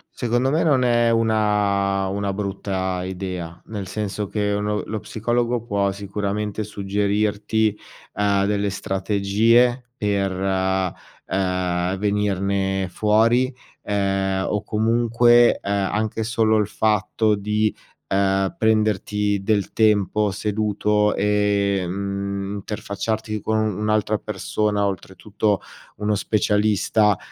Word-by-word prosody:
Secondo 120 +2 0
me 160 +3 +2
non 140 -5 +3
è 120 -1 +3
una 105 -4 +1
una 100 +1 -2
brutta 95 -2 -3
idea. 90 -2 -5
Nel 105 -4 -6
senso 105 +1 -3
che 105 +1 -1
uno 105 +1 -1
lo 110 - -4
psicologo 120 +2 -1
può 100 -3 0
sicuramente 100 +1 -3
suggerirti, 105 +1 0 0.4
uhm, 100 -1 +1
delle 100 0 0
strategie 105 +6 +2
per, 100 -3 0
uhm, 95 -1 0 0.3
ehm, 90 -1 -1
venirne 100 -2 0
fuori, 115 +5 +3 0.3
ehm, 95 -1 0
o 105 - 0
comunque, 120 +2 +4
ehm, 100 -1 -1
anche 110 +1 -1
solo 110 -1 +2
il 105 -2 +1
fatto 105 +1 +1
di, 105 +1 0 0.4
uhm, 95 -1 +1
prenderti 105 -2 +1
del 100 -1 0
tempo 105 -1 +2
seduto 105 0 0
e, 100 -1 +1
mhmm, 100 +1 -3
interfacciarti 105 +1 -4
con 110 0 0
u 110 -3 -1
un'altra 105 0 +1
persona, 105 0 -1
oltretutto, 100 +2 -2 0.4
uno 105 +1 0
specialista, 105 0 +2
105 Hz, 110 wpm, -22 LUFS, 100-110 Hz, 0.4 s, comunque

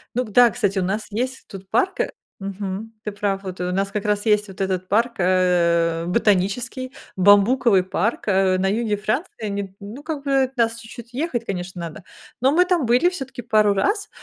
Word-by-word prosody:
Ну, 250 - +1
г 220 - -10
да, 245 +3 +7
кстати, 200 -4 0
у - - 0
нас 200 +4 -2
есть 255 +5 -3
тут 190 -1 -11
парк, 385 - +1
э, - - 0 0.3
мгм. 200 +2 -5
Ты 210 - -3
прав, 200 -1 -2
вот 185 -2 -7
у 180 0 -1
нас 195 +2 -1
как 205 0 -3
раз 210 0 0
есть 210 -1 +3
вот 195 0 -9
этот 185 -1 -1
парк, 230 +5 +2
э, 170 -2 +2
ботанический, 235 +6 0 0.2
бамбуковый 205 +2 +5
парк, 195 +5 -2
э, 190 -2 +3
на 190 - +1
юге 215 +1 0
Франции, 215 - -3
не, 200 -1 -4
ну 215 +8 -9
как 305 -3 -4
бы 275 -1 +2
от 260 +1 -4
нас 230 -1 +2
чуть-чуть 235 +1 -11
ехать, 255 -4 -2
конечно, 180 -2 -5
надо, 170 +4 -7 0.4
но 265 +2 +4
мы 355 +4 +4
там 360 -6 +1
были 245 +9 +4
всё-таки 270 -8 -7
пару 215 -2 +3
раз. 405 - 0
210 Hz, 200 wpm, -22 LUFS, 190-245 Hz, 0.4 s, да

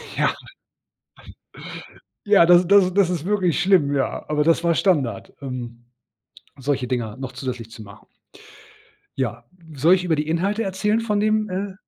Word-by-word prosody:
Ja. - - +1 1.9
Ja, 200 -5 +6
das 175 +1 +6
das 200 -1 +6
ist 180 - -3
das 195 -3 +4
ist - - -1
das 175 - -1
ist - - -10
wirklich 185 -4 +1
schlimm, 175 -7 +3
ja. 135 -1 -2
Aber 150 0 +1
das 165 +1 +2
war 170 -1 +2
Standard, 140 - 0
ähm, 120 -3 -7 0.7
solche 135 -2 -2
Dinger 120 -3 -3
noch 130 -1 -7
zusätzlich 125 -3 -6
zu 110 -1 -11
machen. 100 0 -15 1.1
Ja. 120 -2 -3 0.3
Soll 160 +7 +4
ich 180 - -3
über 165 -3 +1
die 150 +1 -3
Inhalte 195 +7 -1
erzählen 210 +3 0
von 210 -3 -1
dem, 215 0 +1
äh 190 +1 -4
165 Hz, 165 wpm, -22 LUFS, 130-195 Hz, 1.9 s, Ja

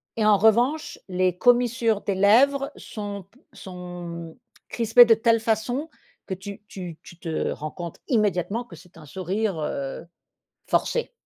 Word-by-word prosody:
et 220 - 0
en 210 -1 +6
revanche 240 +9 +2
les 180 -1 +1
commissures 240 -1 +3
des 200 - -2
lèvres 270 +8 +4
sont 205 -2 -6
p 245 - -25
sont 175 -3 -8 0.3
crispées 235 +1 +6
de 230 - +6
telle 225 0 +2
façon 230 +7 -1 0.4
que 190 - -4
tu 200 +2 -8
tu 175 -6 -8
tu 175 - -14
te 165 -3 -2
rends 155 0 -5
compte 170 0 -7
immédiatement 210 - 0
que 190 -8 -13
c'est 180 +2 -18
un 155 - -12
sourire, 190 +3 -2
heu, 140 -2 -4 0.7
forcé. 480 +1 0
205 Hz, 150 wpm, -24 LUFS, 180-230 Hz, 0.7 s, en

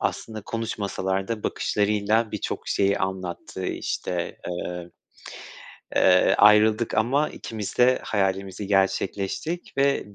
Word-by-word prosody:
aslında 110 -1 -3
konuşmasalar 100 -4 -3
da 115 -2 -3
bakışlarıyla 105 +2 +1
birçok 105 - -4
şeyi 100 0 +2
anlattığı, 95 -2 -4
işte, 90 -1 -3
eee, 90 0 -5 1.1
eee, 90 0 +5
ayrıldık 105 +2 +5
ama 135 +7 +2
ikimiz 110 -3 -6
de 125 +1 +5
hayalimizi 95 -1 -1
gerçekleştirdik 100 - -1
ve 140 -7 +1
105 Hz, 100 wpm, -25 LUFS, 95-110 Hz, 1.1 s, eee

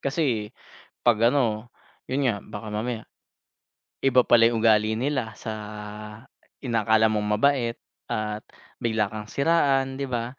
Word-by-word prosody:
Kasi 135 -7 0 0.6
'pag 120 -3 +4
ano 120 -4 0 0.4
yun 135 +1 +1
nga 105 -4 -1
baka 105 0 -8
mamaya, 110 +2 -3 1.0
iba 130 -2 +5
pala 115 -1 +5
yung 115 -1 +1
ugali 110 -1 +4
nila 125 -2 -2
sa 110 - -6 1.1
inaakala 110 -2 +3
mong 105 -1 -1
mabait 125 -2 +2 0.3
at 105 0 -3 0.4
bigla 110 -3 0
kang 110 -1 -7
siraan, 135 -1 +1
di 140 - -2
ba? 125 +1 -4
115 Hz, 125 wpm, -25 LUFS, 110-135 Hz, 1.1 s, iba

